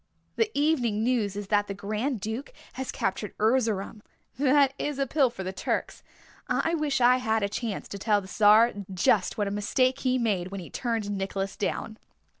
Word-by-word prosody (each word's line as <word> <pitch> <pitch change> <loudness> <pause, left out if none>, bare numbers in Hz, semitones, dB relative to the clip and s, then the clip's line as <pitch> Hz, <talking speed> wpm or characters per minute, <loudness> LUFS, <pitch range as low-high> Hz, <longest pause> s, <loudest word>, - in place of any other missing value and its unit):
The 450 -1 +1
evening 250 -8 +1
news 225 -5 0
is 205 -1 -6
that 205 -1 +2
the 200 - -5
Grand 215 +6 -2
Duke 220 - -5 0.2
has 265 0 -4
captured 210 - -3
Erzerum. 220 -2 +1 0.4
That 280 0 +4
is 295 -2 -2
a 275 - +1
pill 270 -1 +2
for 215 -5 -7
the 185 +1 -4
Turks. 185 - -3 0.5
I 330 - 0
wish 300 -4 0
I 250 +1 +5
had 220 -4 0
a - - +2
chance 210 0 -4
to 200 - -6
tell 210 0 +2
the 190 - -10
Czar 215 +4 +5 0.2
just 185 +1 +2
what 205 -2 0
a - - -2
mistake 255 +6 +1
he 255 -1 +1
made 205 -7 0
when 195 +1 -6
he 175 - -10
turned 225 -4 -2
Nicholas 195 0 -3
down." 220 +2 -3
220 Hz, 190 wpm, -27 LUFS, 200-255 Hz, 0.5 s, I